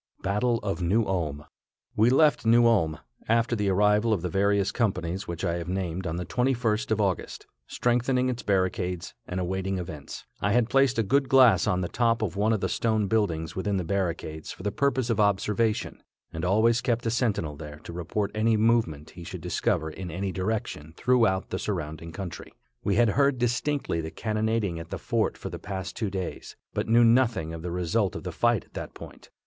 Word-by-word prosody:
BATTLE 105 Hz, +5 st, +1 dB
OF 100 Hz, -2 st, -2 dB
NEW 105 Hz, +6 st, +2 dB
ULM. 75 Hz, -6 st, -2 dB, 0.5 s
We 110 Hz, +3 st, +4 dB
left 150 Hz, +3 st, +4 dB
New 115 Hz, +1 st, +5 dB
Ulm, 85 Hz, -9 st, +3 dB, 0.3 s
after 115 Hz, +1 st, +2 dB
the 105 Hz, -2 st, 0 dB
arrival 105 Hz, +3 st, +3 dB
of 95 Hz, -5 st, -2 dB
the 90 Hz, -, -1 dB
various 100 Hz, 0 st, +2 dB
companies 95 Hz, -5 st, -1 dB
which 85 Hz, 0 st, -4 dB
I 85 Hz, 0 st, 0 dB
have 85 Hz, -, -6 dB
named 90 Hz, -1 st, -2 dB
on 80 Hz, -, -2 dB
the 90 Hz, +1 st, -3 dB
21st 125 Hz, -4 st, 0 dB
of 110 Hz, -1 st, +1 dB
August, 95 Hz, -4 st, -2 dB, 0.2 s
strengthening 125 Hz, +1 st, +1 dB
its 125 Hz, -1 st, -2 dB
barricades 90 Hz, -3 st, -1 dB
and 90 Hz, -, -3 dB
awaiting 95 Hz, +1 st, -2 dB
events. 80 Hz, -5 st, -7 dB, 0.2 s
I 100 Hz, +1 st, +1 dB
had 120 Hz, -1 st, +2 dB
placed 135 Hz, -2 st, +3 dB
a 115 Hz, -, +3 dB
good 135 Hz, +6 st, +1 dB
glass 130 Hz, -4 st, +6 dB
on 90 Hz, -3 st, +1 dB
the 90 Hz, -, -1 dB
top 115 Hz, +1 st, +1 dB
of 95 Hz, -4 st, -2 dB
one 105 Hz, +3 st, +2 dB
of 110 Hz, -3 st, 0 dB
the 95 Hz, -, +1 dB
stone 110 Hz, +2 st, 0 dB
buildings 90 Hz, -7 st, 0 dB
within 100 Hz, +1 st, -1 dB
the 90 Hz, -, -1 dB
barricades 85 Hz, -4 st, -3 dB
for -, -, -10 dB
the 105 Hz, -, -1 dB
purpose 130 Hz, -3 st, 0 dB
of 110 Hz, -, 0 dB
observation, 105 Hz, +2 st, +1 dB, 0.3 s
and 80 Hz, 0 st, -5 dB
always 110 Hz, +5 st, +3 dB
kept 120 Hz, -1 st, 0 dB
a 115 Hz, -, +1 dB
sentinel 105 Hz, -, 0 dB
there 75 Hz, 0 st, -9 dB
to -, -, -8 dB
report 100 Hz, +4 st, -2 dB
any 110 Hz, +1 st, +2 dB
movement 105 Hz, -10 st, +1 dB
he 85 Hz, -, -10 dB
should -, -, -7 dB
discover 80 Hz, 0 st, -1 dB
in 90 Hz, +3 st, -7 dB
any 95 Hz, +4 st, -3 dB
direction 90 Hz, -5 st, -3 dB
throughout 115 Hz, -7 st, +2 dB
the 95 Hz, -, -2 dB
surrounding 80 Hz, -4 st, -4 dB
country. 90 Hz, -1 st, -7 dB, 0.3 s
We 100 Hz, -, +1 dB
had 120 Hz, +1 st, +4 dB
heard 140 Hz, +4 st, +2 dB
distinctly 125 Hz, -, 0 dB
the 80 Hz, -, -5 dB
cannonading 110 Hz, -3 st, -1 dB
at 80 Hz, -, -9 dB
the -, -, -4 dB
fort -, -, -1 dB
for -, -, -7 dB
the -, -, -6 dB
past 95 Hz, -2 st, -5 dB
two 110 Hz, -3 st, -2 dB
days, 95 Hz, -2 st, -5 dB, 0.2 s
but -, -, -2 dB
knew 120 Hz, +1 st, +6 dB
nothing 115 Hz, -9 st, +2 dB
of 80 Hz, -, -6 dB
the 90 Hz, -, -4 dB
result 90 Hz, +3 st, 0 dB
of -, -, -6 dB
the -, -, -4 dB
fight -, -, +1 dB
at -, -, -31 dB
that -, -, -7 dB
point. -, -, -12 dB
100 Hz, 200 wpm, -27 LUFS, 90-115 Hz, 0.5 s, glass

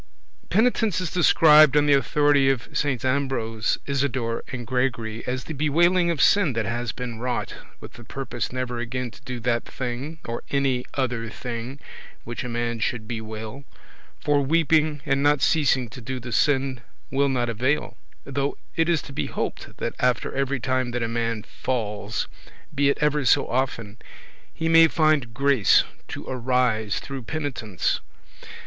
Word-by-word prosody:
[Penitence 220 Hz, -1 st, +2 dB
is 180 Hz, -4 st, -3 dB
described, 155 Hz, -4 st, +6 dB
on 145 Hz, -, +4 dB
the 145 Hz, -, +5 dB
authority 140 Hz, 0 st, +3 dB
of 135 Hz, +3 st, -2 dB
Saints 140 Hz, -4 st, 0 dB
Ambrose, 130 Hz, -5 st, 0 dB
Isidore, 130 Hz, -4 st, -1 dB
and 125 Hz, -3 st, -6 dB
Gregory, 115 Hz, -3 st, -1 dB
as 125 Hz, 0 st, -2 dB
the 160 Hz, -, -6 dB
bewailing 170 Hz, +5 st, +3 dB
of 165 Hz, -4 st, +2 dB
sin 200 Hz, -9 st, +4 dB
that 115 Hz, -1 st, -1 dB
has 120 Hz, +2 st, -2 dB
been 120 Hz, -3 st, -6 dB
wrought, 125 Hz, 0 st, -2 dB, 0.3 s
with -, -, -11 dB
the 120 Hz, -, -12 dB
purpose 120 Hz, -1 st, -4 dB
never 125 Hz, -1 st, -3 dB
again 120 Hz, +1 st, -3 dB
to -, -, -16 dB
do 130 Hz, -3 st, -6 dB
that 120 Hz, 0 st, 0 dB
thing, 130 Hz, +5 st, -5 dB
or 115 Hz, 0 st, -4 dB
any 135 Hz, -3 st, 0 dB
other 125 Hz, -4 st, -1 dB
thing 120 Hz, +3 st, -6 dB, 0.4 s
which 120 Hz, +2 st, -5 dB
a 125 Hz, -, -5 dB
man 120 Hz, 0 st, -2 dB
should 110 Hz, -1 st, -2 dB
bewail; 110 Hz, +3 st, -6 dB, 0.6 s
for 145 Hz, -1 st, +2 dB
weeping 155 Hz, 0 st, +2 dB
and 135 Hz, -1 st, +1 dB
not 145 Hz, 0 st, +4 dB
ceasing 135 Hz, -6 st, +2 dB
to 125 Hz, -, -10 dB
do 130 Hz, +3 st, -4 dB
the 125 Hz, 0 st, -8 dB
sin 130 Hz, +1 st, +1 dB, 0.3 s
will 140 Hz, +1 st, +2 dB
not 125 Hz, -2 st, 0 dB
avail 130 Hz, +6 st, -1 dB, 0.2 s
— -, -, -34 dB
though 140 Hz, +1 st, -2 dB, 0.2 s
it 165 Hz, +1 st, +2 dB
is 170 Hz, -3 st, +2 dB
to 140 Hz, -, -10 dB
be -, -, -2 dB
hoped -, -, -5 dB
that -, -, -3 dB
after 125 Hz, -1 st, +1 dB
every 135 Hz, 0 st, -1 dB
time 130 Hz, 0 st, 0 dB
that 120 Hz, 0 st, -2 dB
a -, -, 0 dB
man 115 Hz, -2 st, -2 dB
falls, 105 Hz, -4 st, -3 dB, 0.5 s
be 140 Hz, 0 st, +3 dB
it -, -, +1 dB
ever 150 Hz, -1 st, +2 dB
so 125 Hz, -, +4 dB
often, 115 Hz, -4 st, -2 dB, 0.5 s
he 165 Hz, -, -3 dB
may 165 Hz, 0 st, +7 dB
find 155 Hz, -7 st, +1 dB
grace 140 Hz, -5 st, +4 dB, 0.2 s
to -, -, -7 dB
arise 125 Hz, -4 st, 0 dB
through 135 Hz, -1 st, -6 dB
penitence. 125 Hz, -, -2 dB
130 Hz, 165 wpm, -24 LUFS, 120-145 Hz, 0.6 s, may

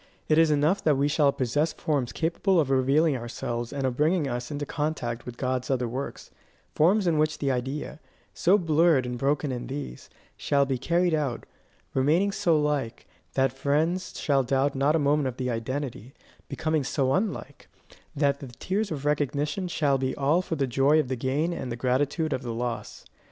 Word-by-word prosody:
It 155 Hz, +1 st, +4 dB
is 165 Hz, -1 st, +5 dB
enough 155 Hz, +7 st, +2 dB
that 150 Hz, -3 st, +3 dB
we 140 Hz, +1 st, +2 dB
shall 145 Hz, -1 st, +3 dB
possess 145 Hz, +5 st, 0 dB
forms 140 Hz, -6 st, -1 dB
capable 170 Hz, +3 st, +1 dB
of 140 Hz, -4 st, +1 dB
revealing 135 Hz, +4 st, +3 dB
ourselves 120 Hz, 0 st, -4 dB
and 140 Hz, -2 st, -2 dB
of 130 Hz, -2 st, -1 dB
bringing 155 Hz, +2 st, +2 dB
us 120 Hz, -1 st, -4 dB
into 145 Hz, -1 st, -4 dB
contact 140 Hz, -7 st, -3 dB
with 120 Hz, -1 st, -7 dB
God's 130 Hz, -1 st, -2 dB
other 125 Hz, -3 st, 0 dB
works; 130 Hz, +4 st, -6 dB, 0.4 s
forms 190 Hz, +6 st, +3 dB
in 165 Hz, -3 st, +2 dB
which 155 Hz, 0 st, +1 dB
the 140 Hz, -2 st, 0 dB
idea, 135 Hz, +4 st, -4 dB, 0.3 s
so 190 Hz, +4 st, +4 dB
blurred 165 Hz, -5 st, +3 dB
and 125 Hz, 0 st, -3 dB
broken 140 Hz, +3 st, 0 dB
in 125 Hz, -1 st, -4 dB
these, 135 Hz, -, -7 dB, 0.3 s
shall 140 Hz, -1 st, +1 dB
be 135 Hz, -2 st, -2 dB
carried 170 Hz, +4 st, +1 dB
out 140 Hz, -6 st, -1 dB, 0.5 s
remaining 160 Hz, +9 st, +2 dB
so 165 Hz, -5 st, +2 dB
like, 150 Hz, -6 st, -2 dB, 0.3 s
that 135 Hz, -1 st, +2 dB
friends 155 Hz, +7 st, -1 dB
shall 140 Hz, -2 st, +2 dB
doubt 135 Hz, +2 st, +1 dB
not 140 Hz, +3 st, +2 dB
a -, -, +4 dB
moment 145 Hz, -1 st, +2 dB
of 125 Hz, -1 st, -5 dB
the 125 Hz, -1 st, -2 dB
identity, 125 Hz, +1 st, -4 dB, 0.3 s
becoming 155 Hz, -2 st, -1 dB
so 135 Hz, 0 st, 0 dB
unlike, 195 Hz, +1 st, -3 dB, 0.5 s
that 140 Hz, -1 st, +1 dB
the 140 Hz, -, -8 dB
tears 190 Hz, -, -2 dB
of 145 Hz, -4 st, -5 dB
recognition 150 Hz, +4 st, 0 dB
shall 145 Hz, -5 st, +1 dB
be 130 Hz, 0 st, -1 dB
all 145 Hz, +6 st, +2 dB
for 170 Hz, -, -3 dB
the 140 Hz, -3 st, 0 dB
joy 135 Hz, +5 st, +3 dB
of 150 Hz, -, -1 dB
the 130 Hz, -, -1 dB
gain 140 Hz, +7 st, -1 dB
and 130 Hz, -7 st, -5 dB
the -, -, -2 dB
gratitude 140 Hz, +6 st, 0 dB
of 130 Hz, -, -2 dB
the 120 Hz, -3 st, -4 dB
loss. 115 Hz, -2 st, -4 dB
140 Hz, 190 wpm, -26 LUFS, 130-155 Hz, 0.5 s, is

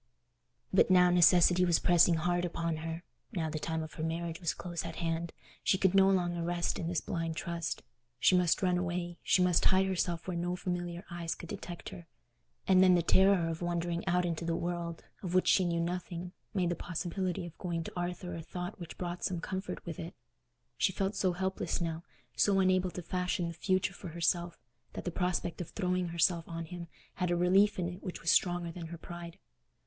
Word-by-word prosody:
But 190 Hz, -, +5 dB
now 180 Hz, -1 st, +6 dB
necessity 180 Hz, 0 st, +6 dB
was 175 Hz, -2 st, +4 dB
pressing 175 Hz, -1 st, +5 dB
hard 175 Hz, +2 st, 0 dB
upon 170 Hz, -2 st, -2 dB
her—now 165 Hz, 0 st, -5 dB
the 155 Hz, -, -3 dB
time 160 Hz, +1 st, -2 dB
of 155 Hz, -, -9 dB
her 160 Hz, -, -5 dB
marriage 165 Hz, 0 st, -3 dB
was 170 Hz, -3 st, 0 dB
close 175 Hz, -2 st, -4 dB
at 165 Hz, -1 st, -6 dB
hand—she 170 Hz, +2 st, -2 dB
could 190 Hz, -1 st, +3 dB
no 195 Hz, 0 st, +6 dB
longer 175 Hz, -3 st, +1 dB
rest 175 Hz, 0 st, -1 dB
in 165 Hz, -, -2 dB
this 170 Hz, -2 st, 0 dB
blind 165 Hz, -1 st, -3 dB
trust. 170 Hz, 0 st, -3 dB, 0.4 s
She 185 Hz, -, +5 dB
must 180 Hz, +1 st, +3 dB
run 180 Hz, -1 st, +3 dB
away; 175 Hz, -1 st, -3 dB
she 185 Hz, -, +3 dB
must 180 Hz, -1 st, +3 dB
hide 190 Hz, 0 st, +5 dB
herself 175 Hz, -2 st, -1 dB
where 180 Hz, -, -2 dB
no 175 Hz, +1 st, -1 dB
familiar 175 Hz, 0 st, -4 dB
eyes 170 Hz, -1 st, -3 dB
could 170 Hz, -, -10 dB
detect 180 Hz, -3 st, -6 dB
her; 170 Hz, -2 st, -10 dB, 0.6 s
and 185 Hz, -1 st, +6 dB
then 185 Hz, -1 st, +7 dB
the 175 Hz, -, +2 dB
terror 190 Hz, -1 st, +4 dB
of 165 Hz, 0 st, -4 dB
wandering 175 Hz, 0 st, -1 dB
out 180 Hz, 0 st, +2 dB
into 170 Hz, -1 st, -2 dB
the 165 Hz, 0 st, 0 dB
world, 170 Hz, -1 st, -3 dB, 0.2 s
of 180 Hz, -2 st, -3 dB
which 185 Hz, -, +4 dB
she 185 Hz, -, +5 dB
knew 170 Hz, -1 st, 0 dB
nothing, 175 Hz, 0 st, -3 dB, 0.2 s
made 180 Hz, -4 st, +1 dB
the 175 Hz, -, 0 dB
possibility 180 Hz, +1 st, -3 dB
of 170 Hz, -1 st, -10 dB
going 170 Hz, -3 st, -2 dB
to -, -, -8 dB
Arthur 175 Hz, 0 st, -3 dB
a 165 Hz, -, -5 dB
thought 180 Hz, +4 st, -6 dB
which 170 Hz, -2 st, -8 dB
brought 175 Hz, 0 st, -4 dB
some 180 Hz, -2 st, -1 dB
comfort 190 Hz, +3 st, -5 dB
with 170 Hz, -3 st, -6 dB
it. 165 Hz, +2 st, -6 dB, 0.6 s
She -, -, +3 dB
felt 195 Hz, +2 st, -1 dB
so 185 Hz, -2 st, +1 dB
helpless 190 Hz, +1 st, -2 dB
now, 165 Hz, -1 st, -2 dB, 0.3 s
so 195 Hz, -1 st, +3 dB
unable 185 Hz, -1 st, +3 dB
to 180 Hz, 0 st, -7 dB
fashion 180 Hz, 0 st, -1 dB
the -, -, -6 dB
future 185 Hz, +1 st, 0 dB
for 185 Hz, -, -9 dB
herself, 170 Hz, +1 st, 0 dB, 0.4 s
that -, -, -6 dB
the 175 Hz, -, -1 dB
prospect 180 Hz, 0 st, -1 dB
of 175 Hz, -, -6 dB
throwing 180 Hz, -2 st, -1 dB
herself 170 Hz, 0 st, +1 dB
on 165 Hz, 0 st, -4 dB
him 175 Hz, 0 st, -7 dB, 0.3 s
had 180 Hz, -1 st, 0 dB
a 175 Hz, -, +2 dB
relief 195 Hz, +4 st, +4 dB
in 180 Hz, -2 st, -1 dB
it 180 Hz, +1 st, -7 dB
which 185 Hz, -, -5 dB
was 170 Hz, -, +2 dB
stronger 175 Hz, -2 st, +2 dB
than 165 Hz, -1 st, -7 dB
her 170 Hz, +1 st, -7 dB
pride. 170 Hz, 0 st, -9 dB
175 Hz, 205 wpm, -32 LUFS, 170-180 Hz, 0.6 s, then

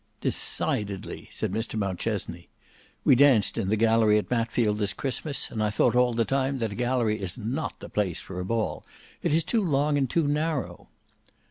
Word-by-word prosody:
"Decidedly," 100 Hz, -2 st, -1 dB
said -, -, -3 dB
Mr 110 Hz, +2 st, -3 dB
Mountchesney. 95 Hz, -3 st, -3 dB, 0.5 s
"We -, -, +6 dB
danced 130 Hz, -5 st, +5 dB
in 100 Hz, -5 st, -1 dB
the 110 Hz, -, +3 dB
gallery 110 Hz, -1 st, +4 dB
at 105 Hz, -, -2 dB
Matfield 115 Hz, -3 st, +1 dB
this 105 Hz, -1 st, 0 dB
Christmas, 140 Hz, +1 st, -2 dB
and 110 Hz, -, -3 dB
I 105 Hz, -, +2 dB
thought 105 Hz, -, +2 dB
all 125 Hz, -1 st, +3 dB
the 115 Hz, -1 st, +2 dB
time 135 Hz, +1 st, 0 dB
that 115 Hz, -4 st, -2 dB
a -, -, -6 dB
gallery 120 Hz, -3 st, 0 dB
is 95 Hz, +2 st, -4 dB
not 125 Hz, +7 st, -3 dB
the -, -, -8 dB
place 95 Hz, -6 st, -1 dB
for 90 Hz, -1 st, -7 dB
a -, -, -2 dB
ball; 115 Hz, +2 st, -2 dB, 0.4 s
it -, -, 0 dB
is 160 Hz, +2 st, +3 dB
too 225 Hz, +5 st, +1 dB
long 145 Hz, -3 st, +1 dB
and 135 Hz, -3 st, 0 dB
too 165 Hz, +1 st, +1 dB
narrow." 150 Hz, -1 st, -2 dB
115 Hz, 190 wpm, -26 LUFS, 105-135 Hz, 0.5 s, We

